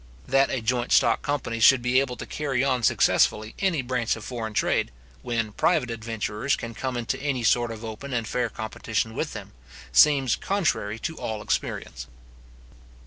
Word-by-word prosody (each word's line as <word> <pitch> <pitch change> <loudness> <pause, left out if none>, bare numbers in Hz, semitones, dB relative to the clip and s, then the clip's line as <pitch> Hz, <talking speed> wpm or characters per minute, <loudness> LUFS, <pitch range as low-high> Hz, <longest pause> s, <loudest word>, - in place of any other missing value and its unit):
That 135 +1 +3
a 125 -4 -2
joint 120 +1 0
stock - - +4
company 140 -6 -2
should 120 +2 +6
be 125 +1 +3
able 130 -2 -2
to - - -6
carry 135 -4 -1
on 130 -2 +1
successfully 110 -1 +2
any 175 -8 +1
branch 125 -2 0
of 110 - -9
foreign 110 -4 -5
trade, - - +1 0.3
when 115 -2 -2
private 135 - +1
adventurers 115 +2 -2
can 115 -1 -7
come 130 +2 -3
into 120 +1 -3
any 135 -4 -1
sort 120 +1 +2
of 115 0 -7
open 115 +5 -7
and 115 -3 -1
fair 125 0 -1
competition 110 0 -3
with - - -3
them, - - -8 0.4
seems 140 -5 +5
contrary 165 - -1
to 160 +7 -5
all 110 -1 -4
experience. - - -3
120 Hz, 170 wpm, -25 LUFS, 110-135 Hz, 0.4 s, should